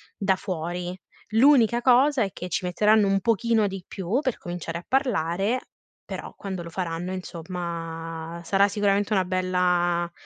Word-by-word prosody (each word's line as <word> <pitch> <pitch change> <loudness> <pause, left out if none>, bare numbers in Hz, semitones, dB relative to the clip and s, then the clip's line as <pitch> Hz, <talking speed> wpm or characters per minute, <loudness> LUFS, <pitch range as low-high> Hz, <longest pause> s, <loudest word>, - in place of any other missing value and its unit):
da 195 -1 +1
fuori. 180 -1 -4 0.4
L'unica 240 -2 +5
cosa 260 +1 +4
è 195 - -3
che 180 - -6
ci 180 - -1
metteranno 210 +4 +4
un 195 0 +2
pochino 230 -1 +2
di 195 -2 -6
più 195 +6 -1
per 260 -5 -1
cominciare 175 -1 -5
a 175 - -15
parlare, 215 - +1 0.4
però - - -7
quando 190 -4 -5
lo 170 - -9
faranno, 175 0 -3
insomma, 165 -2 -6
sarà 195 +4 +3
sicuramente 205 +1 +1
una 190 -2 +2
bella 180 -1 +1
185 Hz, 145 wpm, -25 LUFS, 175-210 Hz, 0.4 s, L'unica